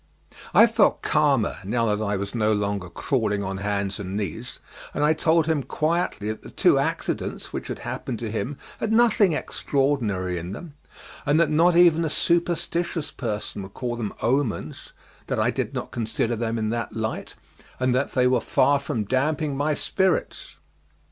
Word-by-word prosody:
I - - +8
felt - - +2
calmer - - +2
now 115 +4 0
that 105 - -3
I 100 -1 0
was 100 +1 -4
no 110 -2 +2
longer 100 -3 -2
crawling 105 -2 -1
on 95 0 -3
hands 100 0 -2
and 100 0 -4
knees, 100 -7 -5 0.4
and 145 - 0
I 150 +1 +5
told 160 0 +2
him 160 -3 +1
quietly 155 -5 -1
that 110 - -4
the - - -11
two - - +3
accidents - - -3
which - - -4
had - - -4
happened 120 - -4
to 110 -1 -4
him 115 +6 -3 0.2
had 220 - -1
nothing 220 -5 +4
extraordinary 115 - -1
in 90 +3 -6
them, 165 +6 -9 0.5
and 145 +2 +3
that 170 - +3
not 165 +3 +4
even 170 -1 +6
a 160 - 0
superstitious 170 -1 0
person 105 -4 -4
would 95 0 -10
call 120 -2 -3
them 110 -4 -3
omens, 125 -2 -1 0.4
that - - -1
I - - +2
did - - -3
not - - -4
consider 115 +1 -1
them 115 0 -2
in 110 -1 -1
that 115 0 -3
light, 110 0 -4 0.4
and 130 -1 +2
that 130 +3 0
they 125 -1 +3
were 125 -2 +3
far 140 0 +3
from 115 -5 -2
damping 140 +6 0
my 145 +2 0
spirits. 190 +2 -1
125 Hz, 175 wpm, -24 LUFS, 105-155 Hz, 0.5 s, I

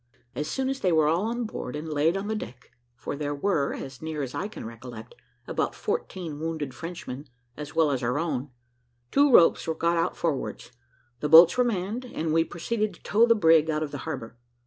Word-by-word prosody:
As 150 - -3
soon 265 +9 -1
as 270 0 -2
they 185 - +1
were 155 -2 +4
all 170 +6 +1
on 240 +1 -2
board, 180 - -5
and 150 +2 -5
laid 155 +4 +1
on 195 - -4
the 220 - -1
deck 125 - -8 0.2
for 120 - -5
there 145 0 -3
were, 145 -2 0
as 135 -1 -8
near 160 -2 -3
as 130 - -5
I 200 - -2
can 215 - -9
recollect, 115 0 -9 0.3
about - - -2
fourteen 165 -6 -4
wounded 155 -4 -3
Frenchmen 150 -3 -7 0.3
as 150 0 -8
well 160 -3 +3
as 135 -2 -1
our 125 +2 0
own 145 -4 -2 0.6
two 285 0 +4
ropes 170 -8 +5
were 160 - -1
got 170 +1 +1
out 165 +2 0
forwards, 150 -6 -3 0.5
the 150 - -2
boats 165 +2 +9
were 250 - +4
manned, 225 +2 -2
and 160 -10 -3
we 165 0 +4
proceeded 210 +4 -2
to - - -23
tow 225 +3 +4
the 230 - +5
brig 160 -5 +5
out 155 0 0
of 150 - -5
the 145 - -5
harbour. 115 -2 -6
160 Hz, 215 wpm, -26 LUFS, 145-190 Hz, 0.6 s, boats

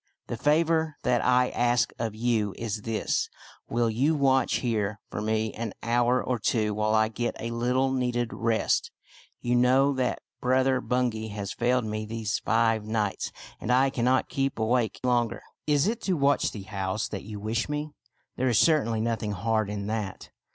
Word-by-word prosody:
The - - -4
favor 160 +3 +2
that 120 -2 +2
I 125 0 +3
ask 120 0 +1
of 115 -2 -2
you 110 -4 0
is 110 -2 -3
this: 115 0 -1 0.4
Will 120 0 +1
you 130 +8 +2
watch 135 -2 +3
here 105 -4 -1
for - - -3
me 110 0 0
for - - -9
an 115 -3 -3
hour 120 +2 +2
or 125 -2 -1
two 105 0 +1
while 110 +1 +1
I 110 0 +4
get 120 +2 -3
a 115 - -4
little 125 +3 +1
needed 125 -2 -1
rest? 115 -1 +1 0.5
You 120 - 0
know 130 +3 +4
that 130 -2 -1 0.2
Brother 130 +1 +2
Bungay 120 -4 -1
has 100 -2 -5
failed 125 0 +1
me 110 0 -3
these 110 -1 -2
five 115 -1 +2
nights, 105 - -2 0.3
and 120 - -2
I 130 +2 +4
cannot 130 +1 +2
keep 135 0 -1
awake 115 -1 +1
longer." 120 -2 +1
" - - -55
Is 145 -1 +3
it 230 +3 -1
to 190 - 0
watch 140 0 +3
the 105 - -7
house 95 0 -2
that 100 - -5
you 105 0 -8
wish 110 +4 -2
me? 150 +1 -3 0.5
There 130 0 +1
is 120 - +3
certainly 115 -9 +3
nothing 110 -2 -1
hard 110 +2 0
in 100 -1 -4
that. 105 -2 -4
115 Hz, 180 wpm, -27 LUFS, 110-125 Hz, 0.5 s, I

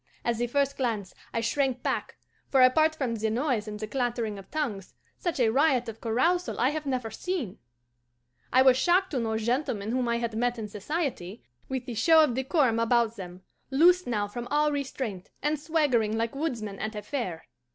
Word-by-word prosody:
At 235 -1 +1
the 240 - 0
first 280 +2 0
glance 220 -8 -2 0.2
I 230 - -1
shrank 260 +2 0
back, - - -2 0.3
for, 265 -2 +5
apart 310 +5 +4
from 265 -6 -2
the 220 -1 -1
noise 235 -2 0
and 210 0 -6
the 215 - -3
clattering 235 -3 -2
of 195 - -14
tongues, 235 -12 -3 0.2
such 345 -5 -2
a 235 -3 +4
riot 265 -2 +3
of 225 0 -7
carousal 335 +11 +1
I 255 - +3
have 305 -1 -4
never 250 -4 -2
seen. 310 - -4 0.9
I 260 +1 +6
was 260 -1 +6
shocked 360 +7 +2
to 270 - 0
note 220 -1 -1
gentlemen 230 -3 -1
whom 250 0 0
I 235 0 +1
had 235 -1 -3
met 245 +1 0
in 220 -2 -4
society, 215 - -4 0.3
with 260 -2 -3
the 245 - -5
show 320 +8 +6
of 285 -6 +1
decorum 265 -2 +1
about 230 -1 +2
them, 185 -2 -9 0.3
loosed 350 +6 +4
now 210 -4 0
from 240 +4 -6
all 300 +1 +2
restraint, 260 -9 -4
and 300 +1 +1
swaggering 285 -9 +1
like 230 0 -1
woodsmen 235 -9 -3
at 215 0 -4
a 210 - -5
fair. 205 - -4
245 Hz, 195 wpm, -28 LUFS, 220-285 Hz, 0.9 s, I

